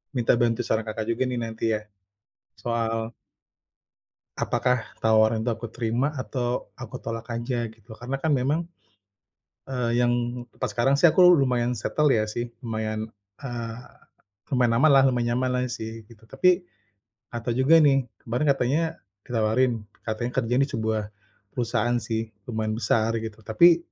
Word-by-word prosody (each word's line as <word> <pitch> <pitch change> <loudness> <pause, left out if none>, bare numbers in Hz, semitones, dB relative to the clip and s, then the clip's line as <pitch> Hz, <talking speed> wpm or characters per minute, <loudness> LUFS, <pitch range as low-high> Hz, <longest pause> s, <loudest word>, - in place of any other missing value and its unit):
minta 120 -1 +3
bantu 115 -1 +2
saran, 110 0 0
Kakak, 110 0 -4
juga 120 +3 0
nih 125 -1 -2
nanti 115 0 -2
ya, 105 - -4 0.8
soal 115 -1 -2 1.2
apakah 125 -1 +1 0.2
tawaran 110 0 +3
itu 120 - +1
aku 115 0 -7
terima 120 +4 0
atau 120 +1 -2
aku 120 -4 -8
tolak 115 0 -6
aja 120 0 -2
gitu. 110 +1 -14
Karena 125 +4 -4
kan 150 +2 +1
memang, 145 +6 +1 1.0
eee, 120 -3 -1
yang 120 0 +3 0.4
tempat - - -3
sekarang 125 +3 +2
sih 160 +4 +6
aku 180 +2 +7
lumayan 125 -4 +1
settle 150 +3 +1
ya 110 - +2
sih 120 +2 -3 0.2
lumayan, 110 -1 -3 0.3
eee, 120 -3 -5 0.8
lumayan 120 -2 +3
aman 155 +4 +5
lah, 135 - +7
lumayan 120 -3 +2
nyaman 130 +1 0
lah 125 - +1
sih 110 -2 -6
gitu. 110 -1 -18
Tapi, 180 +7 +3 0.7
ada 120 0 -3
juga 135 +6 +5
nih 140 -3 +5 0.2
kemarin 120 +6 -2
katanya 135 +2 +2 0.4
ditawarin, 120 +1 +1 0.3
katanya 115 +2 -3
kerjanya 120 +4 +2
di - - -12
sebuah, 110 -1 0 0.5
perusahaan 120 -1 0
sih 115 -1 -2 0.2
lumayan 110 -1 -1
besar 115 0 +1
gitu. 110 -1 -6
Tapi, 165 +10 +6
120 Hz, 150 wpm, -25 LUFS, 115-130 Hz, 1.2 s, aku